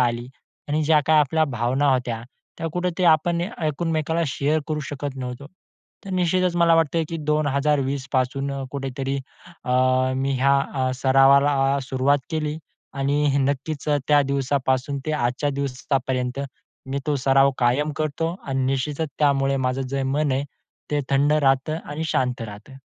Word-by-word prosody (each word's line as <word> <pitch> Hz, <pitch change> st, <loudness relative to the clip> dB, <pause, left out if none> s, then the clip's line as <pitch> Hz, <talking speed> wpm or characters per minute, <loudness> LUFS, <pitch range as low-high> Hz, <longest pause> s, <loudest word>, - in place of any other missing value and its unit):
आली 120 Hz, 0 st, 0 dB, 0.4 s
आणि 150 Hz, +2 st, +1 dB
ज्या 155 Hz, 0 st, +4 dB
काही 155 Hz, 0 st, +5 dB
आपल्या 155 Hz, +3 st, +2 dB
भावना 130 Hz, +1 st, 0 dB
होत्या, 120 Hz, -3 st, -2 dB, 0.4 s
त्या 165 Hz, -, -3 dB
कुठेतरी 180 Hz, 0 st, -1 dB
आपण 170 Hz, +2 st, +3 dB
एकमेकाला 165 Hz, -, -1 dB
शेअर 145 Hz, +3 st, 0 dB
करू 155 Hz, -1 st, -1 dB
शकत 145 Hz, -1 st, -5 dB
नव्हतो. 125 Hz, +1 st, -6 dB, 0.6 s
तर 195 Hz, -, -7 dB
निश्चितच 180 Hz, -1 st, +1 dB
मला 170 Hz, -1 st, +5 dB
वाटतंय 165 Hz, 0 st, +2 dB
की 165 Hz, -, -4 dB
2020 140 Hz, -2 st, +1 dB
पासून 135 Hz, +2 st, 0 dB, 0.2 s
कुठेतरी 135 Hz, 0 st, -3 dB, 0.5 s
अ, 125 Hz, -, -3 dB, 0.5 s
मी 135 Hz, +1 st, 0 dB
ह्या 140 Hz, +1 st, +4 dB, 0.2 s
अ, 130 Hz, -1 st, 0 dB
सरावाला 135 Hz, +1 st, +4 dB
सुरुवात 130 Hz, +2 st, +1 dB
केली 155 Hz, -1 st, -2 dB, 0.4 s
आणि 140 Hz, +1 st, +1 dB
नक्कीच 140 Hz, +2 st, -2 dB
अ, 145 Hz, -, +3 dB
त्या 145 Hz, -1 st, +5 dB
दिवसापासून 135 Hz, 0 st, 0 dB
ते 155 Hz, -, 0 dB
आजच्या 145 Hz, 0 st, 0 dB
दिवसापर्यंत 135 Hz, -1 st, -2 dB, 0.5 s
मी 140 Hz, -, -1 dB
तो 150 Hz, -, +1 dB
सराव 135 Hz, +1 st, +4 dB
कायम 130 Hz, +5 st, +2 dB
करतो 160 Hz, +2 st, -2 dB
आणि 135 Hz, -1 st, -1 dB
निश्चितच 140 Hz, +4 st, -1 dB
त्यामुळे 140 Hz, -2 st, +2 dB
माझं 130 Hz, 0 st, -1 dB
जे 135 Hz, 0 st, -1 dB
मन 140 Hz, +2 st, 0 dB
आहे 135 Hz, +2 st, 0 dB, 0.5 s
ते 145 Hz, -1 st, +1 dB
थंड 140 Hz, +2 st, +3 dB
राहतं 145 Hz, +1 st, +2 dB
आणि 150 Hz, +2 st, -4 dB
शांत 125 Hz, -3 st, 0 dB
राहतं. 115 Hz, +5 st, -10 dB
140 Hz, 145 wpm, -23 LUFS, 135-150 Hz, 0.6 s, काही